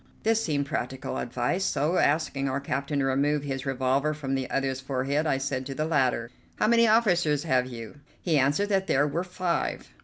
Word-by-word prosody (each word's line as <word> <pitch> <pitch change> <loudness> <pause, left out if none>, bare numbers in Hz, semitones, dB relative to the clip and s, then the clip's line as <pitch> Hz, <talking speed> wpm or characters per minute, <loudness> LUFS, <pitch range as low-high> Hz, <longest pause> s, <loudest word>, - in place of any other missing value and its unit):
This 225 0 +2
seemed 145 -3 0
practical 130 -2 -3
advice, 125 +10 -1
so, 165 +1 +1
asking 145 -2 +1
our 130 +1 -1
captain 140 +1 -2
to 135 - +1
remove 140 +2 +1
his 135 -1 -4
revolver 135 +3 +1
from 135 -3 -4
the 135 -1 -2
other's 135 -1 -1
forehead, 135 +3 -1
I 135 - +2
said 135 -1 -2
to 135 - -5
the 155 - -1
latter: 130 -6 +1 0.2
"How - - +1
many 230 +1 +5
officers 175 -10 +3
have 130 -5 +1
you?" 120 +2 -9 0.2
He 160 -5 +1
answered 145 +10 +2
that 195 -1 +1
there 140 +2 +3
were 160 +5 -2
five. 180 -1 -2
140 Hz, 190 wpm, -27 LUFS, 135-160 Hz, 0.2 s, many